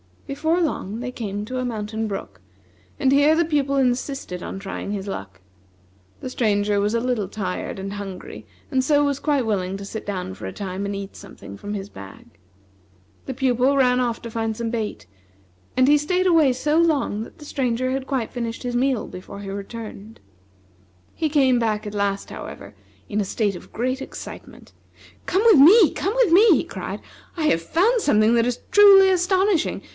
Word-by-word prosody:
Before 320 +5 0
long 230 - -2
they 250 0 -4
came 205 -4 -4
to 255 +3 -4
a 255 - -2
mountain 220 -1 -3
brook, 100 - -6 0.6
and 265 - +2
here 285 +3 +5
the 340 - +3
Pupil 285 -3 0
insisted 255 -7 -1
on - - -6
trying 195 0 -5
his 195 -2 -4
luck. 95 - -7 0.8
The 255 - -5
Stranger 205 -4 +1
was 205 +2 0
a 230 - +1
little 245 -5 -1
tired 190 -2 -4
and 195 +1 -5
hungry, 200 -2 -8 0.2
and 265 -2 +2
so 290 +2 +3
was 285 -1 0
quite 285 -5 +1
willing 190 -3 -1
to 200 - -7
sit 220 +2 -7
down 185 - -4
for 95 - -9
a 95 - -6
time 195 0 -5
and 200 0 -3
eat 195 0 -7
something 100 - -11
from 205 - -6
his 200 -1 -5
bag. 100 - -12 1.0
The 265 - -3
Pupil 260 +1 +2
ran 250 -2 +3
off 240 -2 -1
to 230 - -8
find 225 -1 -2
some 230 -1 -3
bait, 215 - -4 0.7
and 255 0 +5
he 295 - +6
staid 360 +5 0
away 320 -7 +4
so 295 +5 0
long 290 -10 +1
that - - -13
the 300 - -12
Stranger 255 -3 -1
had 265 0 -3
quite 260 -5 -2
finished 235 -1 -4
his 245 -1 -3
meal 255 -1 +1
before 185 +2 -9
he 195 - -7
returned. 210 +1 -8 0.9
He 315 - -1
came 265 -4 +3
back 215 -2 -1
at 210 - -6
last, 200 -1 -1
however, - - -9 0.4
in 210 - -1
a - - -2
state 200 -1 -1
of - - -15
great 255 +3 -2
excitement. - - -10 0.5
"Come 385 +3 +1
with 440 -11 +7
me! 360 +6 +8
come 400 +5 -2
with - - +3
me!" 410 +7 +7
he - - 0
cried. - - -6 0.3
"I 325 -3 -2
have 165 - +2
found 400 - +2
something 215 - +3
that 230 0 +3
is 245 -1 -3
truly 395 -1 +8
astonishing! 375 0 +1
240 Hz, 190 wpm, -22 LUFS, 205-285 Hz, 1.0 s, me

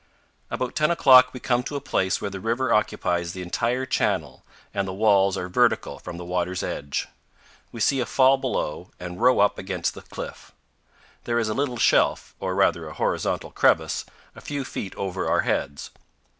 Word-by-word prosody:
About 130 -1 -3
ten 150 0 +2
o'clock 130 -6 +7
we 125 - -8
come 120 0 +1
to 145 - -6
a - - -1
place 95 -9 0
where 100 - -4
the 95 - -6
river 115 +4 0
occupies 85 -5 0
the 95 - -6
entire 120 +8 -1
channel 130 - -1 0.3
and 100 -1 -1
the 95 - -4
walls 100 -2 +3
are 90 - -3
vertical 90 - +1
from 85 - -8
the 90 - -7
water's 90 +1 -2
edge. 70 -1 -3 0.6
We 115 - -7
see 135 +4 +3
a 120 - -1
fall 135 +2 +4
below 90 - -3
and 90 +3 -7
row 125 -2 +5
up 100 - +2
against 95 -3 -2
the - - -10
cliff. - - -9 0.7
There 120 -1 0
is 115 -2 0
a - - 0
little 130 -1 -1
shelf, - - +2
or 95 -1 -2
rather 85 -4 +2
a - - -8
horizontal - - -1
crevice, - - +2 0.3
a - - -12
few 140 -2 -4
feet 95 -6 -6
over 95 -1 -3
our - - +3
heads. 70 - -2
105 Hz, 185 wpm, -24 LUFS, 90-125 Hz, 0.7 s, o'clock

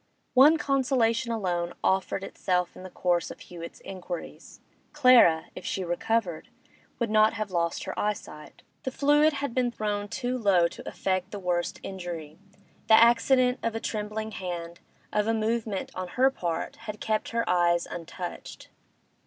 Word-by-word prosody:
One 290 +5 +7
consolation 255 -5 +1
alone 175 -6 -2
offered 190 0 +1
itself 180 -2 -1
in - - -11
the 185 - -8
course 175 -1 0
of - - -10
Hewett's 170 -1 -10
inquiries; 180 -2 -8 0.3
Clara, 250 - +6
if - - -9
she 190 - -2
recovered, 175 0 -1 0.5
would 235 -3 -1
not 215 0 +5
have 215 -3 -4
lost 170 -1 -1
her - - -4
eyesight. 200 -7 -4 0.2
The - - -3
fluid 295 +3 +3
had 280 -3 -3
been 250 -1 +1
thrown 210 -3 -3
too 250 +3 -3
low 190 -6 +4
to - - -9
effect 185 -1 -1
the 205 - -6
worst 180 -2 -2
injury; 175 -5 -7 0.5
the 220 - +8
accident 250 +2 +4
of 230 -1 -2
a - - -1
trembling 215 0 -4
hand, 170 -3 -6 0.3
of 210 0 +1
a 225 - +2
movement 220 -2 -2
on 185 0 -4
her 260 +8 +3
part, 170 -10 -3
had 210 0 -5
kept 215 -1 -1
her 230 0 -1
eyes 175 -1 +3
untouched. 175 +1 -8
210 Hz, 155 wpm, -27 LUFS, 175-235 Hz, 0.5 s, the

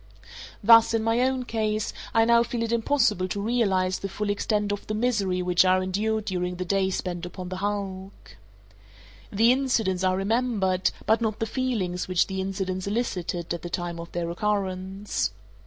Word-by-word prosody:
Thus, 230 +1 +7
in 220 - 0
my 225 +1 +2
own 260 0 0
case, 215 -2 -1 0.2
I 225 0 +4
now 235 0 +5
feel 235 0 -2
it 230 - -2
impossible 225 -5 +2
to 200 - -3
realize 195 -5 +1
the 195 - -4
full 205 +1 -2
extent 205 0 0
of 205 - -4
the 215 - -2
misery 205 -6 0
which 180 0 +4
I 185 0 +4
endured 210 +4 -1
during 180 -2 -2
the 185 +1 -4
days 190 0 +1
spent 175 -1 -4
upon 180 0 -6
the 185 - -4
hulk. 195 -1 -5 1.0
The 225 +4 +4
incidents 230 -8 +1
are 185 0 +2
remembered, 200 -3 +1 0.2
but 220 +1 +3
not 220 -2 -1
the 225 - -1
feelings 225 -7 -2
which 185 -2 +2
the 190 -1 -3
incidents 190 -1 -3
elicited 180 -6 -2
at 170 - -5
the 175 - -6
time 175 -1 -3
of 170 0 -8
their 175 -1 -2
occurrence. 195 0 -2
200 Hz, 175 wpm, -26 LUFS, 185-225 Hz, 1.0 s, Thus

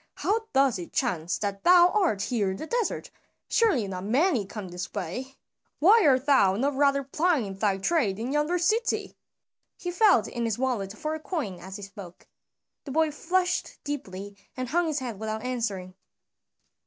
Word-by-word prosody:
"How 445 +2 0
doth 270 -6 +3
it 175 - -8
chance 180 - -1
that 200 -1 -4
thou 355 0 +7
art 350 - +1
here 210 -5 0
in 190 - -4
the - - -6
desert? 475 +4 -2 0.4
Surely 325 - +2
not 185 -1 -5
many 245 - +2
come 205 -3 -7
this 180 +1 -6
way. 215 +8 -5 0.4
Why 415 +8 +6
art 260 -1 +3
thou 200 -10 +4
not 275 +7 0
rather 280 0 +2
plying 275 - 0
thy 195 -1 +1
trade 205 - +1
in 235 +4 -3
yonder 300 +4 +1
city?" 435 +7 0 0.6
He 355 - -4
felt 365 - +4
in 235 -1 -3
his 225 -1 -1
wallet 220 -6 -2
for 310 +6 -3
a 315 - -4
coin 285 - -4
as 190 +1 -9
he 205 - -8
spoke. 195 -3 -11 0.6
The - - -7
boy 315 +2 +2
flushed 360 +4 -1
deeply 205 -8 -6 0.2
and 255 -1 -3
hung 340 +4 +1
his 310 -2 -1
head 245 -7 -4
without 220 +1 -4
answering. 215 -8 -3
255 Hz, 175 wpm, -27 LUFS, 200-315 Hz, 0.6 s, thou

